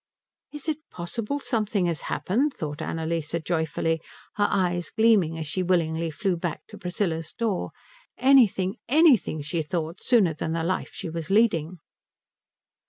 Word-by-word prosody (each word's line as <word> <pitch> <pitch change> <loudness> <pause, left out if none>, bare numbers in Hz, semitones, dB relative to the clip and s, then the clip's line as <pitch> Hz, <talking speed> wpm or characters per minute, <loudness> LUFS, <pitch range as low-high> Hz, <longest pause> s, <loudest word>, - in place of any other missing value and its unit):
"Is 295 +1 -8
it 310 -1 -1
possible 210 +9 -3
something 215 -7 0
has 170 -3 -1
happened?" 235 - 0
thought 150 -1 -5
Annalise 165 -1 -2
joyfully, 165 -1 0 0.3
her 205 0 +2
eyes 175 -3 0
gleaming 210 -8 +3
as 160 - -4
she 170 +5 -2
willingly 165 -2 +1
flew 185 +4 -1
back 170 -2 -4
to 210 - -10
Priscilla's 175 -4 -2
door, 220 -6 -2 0.5
anything, 235 -7 +4
anything, 265 - +4
she 155 +3 -1
thought, 165 +2 -3
sooner 210 -10 +3
than 160 +1 -3
the 165 -1 -1
life 185 +3 -1
she - - -6
was 165 -1 -5
leading. 185 -6 +2
175 Hz, 145 wpm, -26 LUFS, 160-215 Hz, 0.5 s, anything